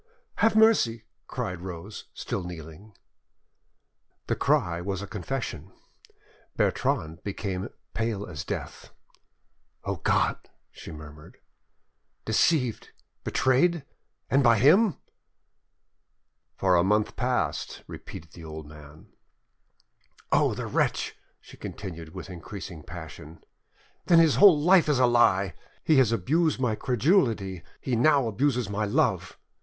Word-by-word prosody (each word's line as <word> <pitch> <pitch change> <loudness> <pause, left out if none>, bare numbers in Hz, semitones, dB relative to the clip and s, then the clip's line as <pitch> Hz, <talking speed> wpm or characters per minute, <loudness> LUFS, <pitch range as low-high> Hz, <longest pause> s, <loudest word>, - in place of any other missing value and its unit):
"Have 225 +1 +3
mercy!" 195 - +4 0.2
cried 90 -1 -4
Rose, 95 +3 -8
still 95 - -4
kneeling. 85 +4 -10 1.3
The - - 0
cry 85 -1 +1
was 95 +1 -3
a - - -4
confession. 110 +6 -5 0.9
Bertrande 95 - 0
became 100 0 -4 0.2
pate 115 -1 -1
as 75 -6 -6
death. - - -6 0.9
"O - - -3
God!" - - +1 0.3
she - - -10
murmured, 75 -1 -12 0.9
"deceived, 125 +1 +1 0.3
betrayed—and 140 0 0
by 120 -2 +5
him!" 170 - +5 1.6
"For 95 -1 +3
a 85 - +4
month 105 +3 +1
past," - - -2
repeated 80 0 -10
the 85 - -12
old 80 -1 -8
man. 75 0 -14 1.3
"Oh! - - +3
the - - -4
wretch," - - -1 0.2
she - - -15
continued, 85 -4 -8
with 95 - -7
increasing 90 -2 -8
passion; 80 -1 -10 0.6
"then 170 - +6
his 165 -3 +5
whole 190 -7 +8
life 175 +1 +5
is 145 - +3
a 130 - +5
lie! 100 -7 +3 0.3
He 155 - +4
has 130 -4 +4
abused 150 - +1
my 125 -4 +1
credulity, 115 - +1 0.2
he 130 - -2
now 140 +1 +4
abuses 125 +1 0
my 105 +1 -1
love! 100 - 0
105 Hz, 115 wpm, -27 LUFS, 90-135 Hz, 1.6 s, whole